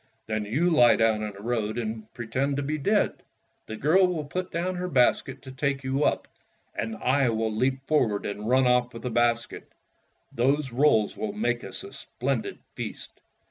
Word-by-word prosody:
"Then 110 -1 -2
you 150 +12 +1
lie 120 -7 +6
down 110 -1 +2
in 105 -1 -4
the 100 +1 -12
road 110 -2 -1
and 110 -1 -4
pretend 130 +4 -1
to 145 - -1
be 155 +2 -2
dead. 205 +9 +1 0.5
The 110 - -5
girl 165 - +4
will 165 -4 -3
put 180 +5 -4
down 175 +2 -2
her 180 0 -2
basket 130 -8 +2
to 130 - -9
take 135 +1 -1
you 135 +2 0
up, - - +1 0.5
and 115 0 -3
I 130 +1 +2
will 110 -1 -1
leap 130 +3 0
forward 120 -9 +1
and 105 +2 -4
run 130 +1 +4
off 125 -1 +2
with 115 - -8
the 125 - -3
basket. 120 0 0 0.6
Those 135 +3 +1
rolls 120 -5 +3
will 215 -2 -3
make 210 +2 -1
us - - -7
a 400 - -10
splendid 400 - -3 0.2
feast." - - -7
130 Hz, 185 wpm, -26 LUFS, 115-150 Hz, 0.6 s, lie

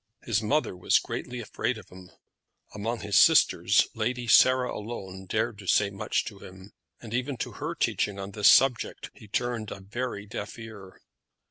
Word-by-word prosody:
His 115 -2 0
mother 140 -1 0
was 90 - +3
greatly 125 0 -5
afraid 115 +1 -3
of 110 - -13
him. 90 -1 -13 0.6
Among 110 +2 -3
his 100 -1 -2
sisters - - +5
Lady 125 0 -2
Sarah 130 +3 +5
alone 95 -4 -7
dared 110 +1 -1
to 95 - -11
say 100 +2 +3
much 100 - -2
to - - -8
him; 95 +2 -13 0.3
and 115 -2 -10
even 125 +2 -2
to - - -4
her - - -5
teaching 100 -1 -1
on 100 0 -6
this 105 0 +2
subject 130 -3 +3
he 110 - -15
turned 115 0 -2
a - - -7
very 100 +1 -5
deaf 105 +1 -7
ear. 110 -5 -11
110 Hz, 170 wpm, -27 LUFS, 100-120 Hz, 0.6 s, sisters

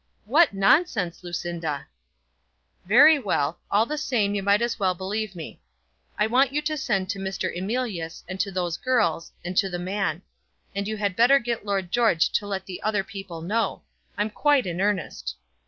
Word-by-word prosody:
"What 305 +10 +5
nonsense, 195 - +2
Lucinda!" 170 -4 -4 1.0
"Very 285 - +7
well; 170 - -1
all 210 +3 +3
the 300 +4 -3
same 225 -9 0
you 205 - -1
might 200 +3 +3
as 235 -1 -2
well 185 -2 +1
believe 195 +2 -3
me. 165 -3 -9 0.6
I 210 - +3
want 250 +4 +3
you 290 - 0
to 310 +1 -1
send 200 -10 -1
to 200 - -5
Mr. 190 -2 -3
Emilius, 190 -4 -3
and 185 +1 -6
to 200 - 0
those 180 -3 -2
girls, 210 -11 0
and 180 +1 -4
to 195 - +3
the 175 - -3
man. 185 -2 -2 0.5
And 200 0 -2
you 215 0 -3
had 200 -3 -1
better 245 +6 +6
get 235 -4 -3
Lord 195 -3 -1
George 225 -9 +3
to 205 - 0
let 195 -2 -3
the 185 -2 -7
other 210 -2 0
people 190 -4 -8
know. 210 +3 -1 0.3
I'm 210 +1 0
quite 290 +2 +3
in 175 0 -3
earnest." 205 -2 -1
200 Hz, 180 wpm, -25 LUFS, 180-230 Hz, 1.0 s, Very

